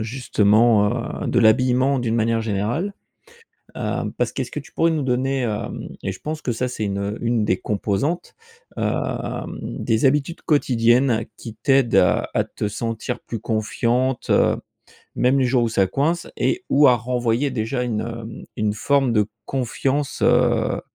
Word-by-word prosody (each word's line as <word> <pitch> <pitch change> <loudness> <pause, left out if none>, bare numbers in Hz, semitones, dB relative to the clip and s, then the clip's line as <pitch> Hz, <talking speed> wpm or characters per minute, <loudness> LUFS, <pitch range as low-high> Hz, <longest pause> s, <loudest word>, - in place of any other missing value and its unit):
justement, 110 -1 +2
heu, - - -2
de 120 - +1
l'habillement 130 +4 +3
d'une 115 -2 -1
manière 115 0 +1
générale. 110 - -1 0.9
Heu, - - -2
parce - - 0
qu'est-ce - - -4
que - - -4
tu - - -13
pourrais 165 - +2
nous 155 -3 -1
donner, 130 0 0
heu- 105 -2 -1 0.5
et 95 - -1
je 95 - -9
pense 155 +1 -5
que 125 - -2
ça 125 +3 -1
c'est 125 -3 -4
une 100 +1 -2
une 115 -2 +1
des 95 - +1
composantes- 105 - -2 0.5
heu, - - +1 0.7
des 115 +2 -1
habitudes 145 +4 +1
quotidiennes 120 -4 +2
qui 115 -2 -9
t'aident 135 -3 +3
à - - +3
à - - +2
te 105 - -4
sentir 115 +3 -4
plus 115 - -6
confiante, 115 +4 -1
heu, - - +3 0.6
même 130 +2 +2
les 135 - +3
jours 125 -1 +2
où - - 0
ça 100 -3 +2
coince. 160 - 0
Et 370 +2 0
ou 145 0 +6
à 125 - +5
renvoyer 120 +3 0
déjà 125 +1 -2
une, 115 -3 -1
heu, 115 0 -6 0.3
une 105 -1 0
forme 135 +3 +1
de 105 -2 +2 0.2
confiance, 135 +3 -2
heu - - +3
120 Hz, 165 wpm, -22 LUFS, 110-135 Hz, 0.9 s, ou